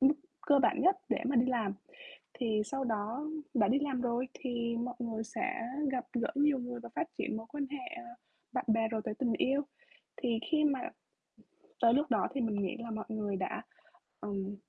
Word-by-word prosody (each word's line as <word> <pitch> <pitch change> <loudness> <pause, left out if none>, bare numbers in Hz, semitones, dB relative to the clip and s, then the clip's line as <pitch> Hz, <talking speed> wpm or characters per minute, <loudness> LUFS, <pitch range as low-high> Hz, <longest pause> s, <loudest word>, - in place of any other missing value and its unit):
mức 275 +3 +7 0.3
cơ 285 -1 +7
bản - - +4
nhất 380 +2 +6
để - - +2
mà 270 -1 +2
đi 240 - +6
làm. 225 -6 +1 0.6
Thì 220 -4 +1
sau 270 +4 -2
đó 225 +5 -1 0.3
đã 210 -5 +4
đi 255 +5 +4
làm 275 -3 0
rồi 245 +1 0
thì 235 -3 -1
mọi 245 +1 -2
người 225 -2 -2
sẽ 230 0 -2 0.3
gặp 250 -1 -1
gỡ 240 -1 +1
nhiều 285 -1 +4
người 245 -1 -4
và 235 - -8
phát 340 -1 0
triển - - -1
mối 225 - -5
quan 285 +1 -2
hệ 270 -2 -6 0.6
bạn 255 - 0
bè 225 0 +4
rồi 220 -1 -1
tới - - -2
tình 240 0 +1
yêu. 275 +5 +2 0.6
Thì 235 -3 +2
khi 310 -1 +4
mà 280 -3 +3 1.0
tới 230 -1 +7
lúc 290 +4 +3
đó 220 - +4
thì 275 - 0
mình 225 -3 +1
nghĩ 260 - -2
là 235 -1 -5
mọi 215 0 -3
người 210 -2 -1
đã, 190 0 -2 0.6
ừm, 200 0 -3
240 Hz, 200 wpm, -33 LUFS, 225-270 Hz, 1.0 s, mức